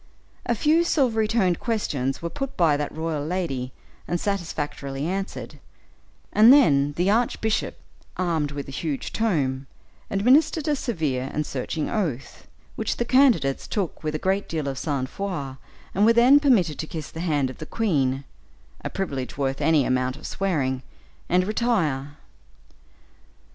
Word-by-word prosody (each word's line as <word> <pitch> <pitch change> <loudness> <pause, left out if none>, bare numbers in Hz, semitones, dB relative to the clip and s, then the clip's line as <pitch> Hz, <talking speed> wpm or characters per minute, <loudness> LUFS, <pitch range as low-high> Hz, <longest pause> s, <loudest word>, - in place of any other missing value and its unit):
A 240 - +2
few 310 +8 +3
silvery 245 -10 +2
toned 190 -6 +1
questions 145 - -2
were 170 - -2
put 275 -1 -5
by 165 -5 +4
that 145 0 -2
royal 160 -1 -3
lady 150 -7 -2 0.4
and 175 - -1
satisfactorily 150 -8 -3
answered, 195 +3 -4 0.7
and 220 +3 +8
then 145 - +5
the 180 +6 +1
archbishop, 220 -1 0 0.4
armed 165 -5 0
with 140 -1 -6
a - - -7
huge 145 0 -4
tome, 140 -12 0 0.4
administered 285 +9 +3
a 300 - +2
severe 150 - -2
and 150 - -2
searching 145 +4 -3
oath, 155 - -3 0.3
which - - -2
the 240 - -1
candidates 235 - +3
took 195 -6 -3
with 155 0 -2
a - - +1
great 190 +5 -1
deal 155 -3 -2
of 135 -1 -3
sang 140 -4 -1
froid, 145 -5 -5 0.4
and 200 - +2
were 230 +2 +6
then 250 +5 +7
permitted 205 - +2
to 155 - -3
kiss 155 -2 -6
the 160 - -8
hand 145 -6 0
of - - -14
the 155 - -7
queen 140 - 0 0.6
a - - -2
privilege 140 -11 -4
worth 135 0 -1
any 150 -2 +3
amount 130 0 0
of - - -12
swearing 140 -10 -1 0.5
and 180 +1 +3
retire. 165 - 0
165 Hz, 155 wpm, -24 LUFS, 140-215 Hz, 0.7 s, and